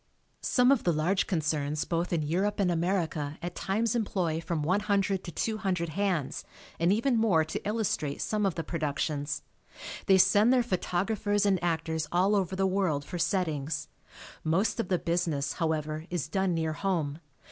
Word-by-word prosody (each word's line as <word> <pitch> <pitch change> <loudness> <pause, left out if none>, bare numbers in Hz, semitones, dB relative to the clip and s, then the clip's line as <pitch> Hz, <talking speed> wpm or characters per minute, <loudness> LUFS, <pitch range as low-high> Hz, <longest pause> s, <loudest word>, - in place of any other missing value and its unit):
Some 250 +1 +4
of 275 - +3
the 175 - +3
large 170 +5 +1
concerns 155 -3 -1
both 170 +1 -1
in 165 -3 +1
Europe 190 +8 0
and 185 -3 +2
America 165 -4 -1
at 175 0 -3
times 215 +5 0
employ 185 -8 -1
from 165 -2 -2
one 185 +6 +2
hundred 200 -2 0
to 170 - -6
two 220 +5 -2
hundred 180 -5 -1
hands 175 -4 -1 0.4
and 170 +2 +3
even 235 +5 +2
more 180 -8 +3
to 155 - -4
illustrate 210 -9 -1
some 210 -1 -1
of 195 -4 +1
the 165 - -3
productions. 150 -2 -2 0.6
They 190 -2 +6
send 205 +5 +5
their 255 -2 +4
photographers 205 +1 0
and 190 -3 +2
actors 160 -2 -1
all 190 +4 +3
over 190 -2 0
the 195 0 +1
world 185 -7 0
for 175 - -5
settings. 155 -5 -1 0.5
Most 195 +8 +1
of 230 - 0
the 180 - +2
business, 165 -5 -1
however, 155 -1 -1
is 175 -5 -2
done 190 +1 0
near 160 -1 -1
home. 160 -5 -1
175 Hz, 170 wpm, -29 LUFS, 160-200 Hz, 0.6 s, They